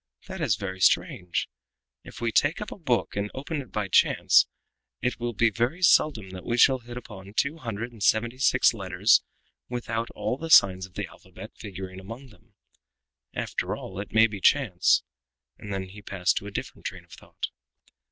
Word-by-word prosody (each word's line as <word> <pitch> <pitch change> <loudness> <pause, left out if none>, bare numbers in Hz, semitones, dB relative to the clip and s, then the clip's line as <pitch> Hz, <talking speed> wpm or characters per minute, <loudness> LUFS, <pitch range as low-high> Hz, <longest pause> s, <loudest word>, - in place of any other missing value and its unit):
That 190 -2 -6
is 130 - +2
very 95 -1 -6
strange. 90 -1 +1 0.6
If - - -11
we 115 -1 0
take 145 +8 +2
up 210 - -6
a - - -6
book 120 - 0
and 100 +1 -2
open 145 +3 -4
it 130 - -13
by 105 -2 -2
chance - - +4 0.5
it 125 0 -2
will 120 0 -2
be 115 +1 +3
very 120 - -1
seldom 115 - +4
that 95 0 -8
we 120 - -1
shall 130 +1 +5
hit 120 0 -10
upon 105 -4 -10
two 140 +6 +1
hundred 115 -3 -5
and 115 -3 -15
seventy 115 +5 +2
six 130 -2 +4
letters 95 0 +3 0.5
without 115 -2 -3
all 130 - -2
the 165 - -5
signs 95 -8 +6
of 90 - -27
the - - -3
alphabet - - -13
figuring 95 -2 -8
among 115 +8 -10
them. 110 -1 -23 0.8
After - - -2
all, 95 0 -8
it 100 - -6
may 110 +1 +6
be 105 -3 -4
chance," 115 -11 +3 0.6
and 105 - -8
then 95 -1 -2
he 105 +2 -12
passed 100 -3 0
to 100 - -3
a - - -7
different - - -5
train - - -8
of - - -27
thought. - - -7
110 Hz, 190 wpm, -26 LUFS, 95-125 Hz, 0.8 s, signs